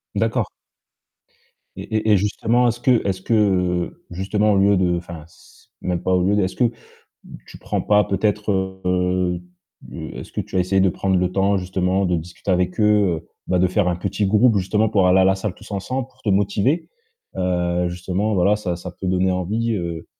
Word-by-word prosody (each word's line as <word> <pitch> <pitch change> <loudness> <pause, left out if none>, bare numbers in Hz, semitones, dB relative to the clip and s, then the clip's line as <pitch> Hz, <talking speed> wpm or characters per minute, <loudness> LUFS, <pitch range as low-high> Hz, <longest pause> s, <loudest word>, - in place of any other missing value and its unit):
D'accord. - - 0 1.3
Et - - -7
et 110 0 +1
et 105 - +6
justement, 115 +5 +1
est-ce 120 0 -1
que 125 -5 +2
est-ce 95 -1 -2
que, 115 - -1
heu, 90 -5 +1
justement, 105 +3 +1
au - - +2
lieu 100 0 +4
de, 90 -1 +2
enfin, 85 -3 -8
c - - -22
même 90 -2 -2
pas 95 - 0
au 90 -1 +3
lieu 100 +2 +2
de, 105 - +2
est-ce 95 - -3
que 120 -2 +2 0.8
tu - - -12
prends - - -2
pas 105 0 +3
peut-être, 105 +2 -1 0.4
heu, 90 -1 0 0.7
est-ce - - -9
que - - -2
tu - - -6
as - - +3
essayé 95 +2 +1
de 95 - +4
prendre 95 +2 0
le 90 0 0
temps 100 +1 +2
justement 95 +1 0
de 90 -1 +1
discuter 85 +4 -6
avec 90 +3 0
eux, 105 -5 +3
heu, 85 - -18 0.2
bah, 90 - +1
de 90 - +4
faire 95 0 +1
un 90 - 0
petit 100 +3 -1
groupe, 105 +3 +4
justement, 105 +3 +1
pour 100 -3 +2
aller 95 +1 +5
à - - +5
la 95 0 +4
salle 95 -1 -4
tous 110 +1 -15
ensemble, 125 +6 -3
pour - - -28
te - - -4
motiver, 100 - +1 0.5
heu, 90 -1 0
justement, 95 +4 -2
voilà, 100 +3 +3
ça 90 -5 -3
ça 90 +1 -8
peut 95 - -3
donner 95 +1 +2
envie, 110 +6 -1
heu, 85 -4 -4
95 Hz, 205 wpm, -21 LUFS, 90-105 Hz, 1.3 s, et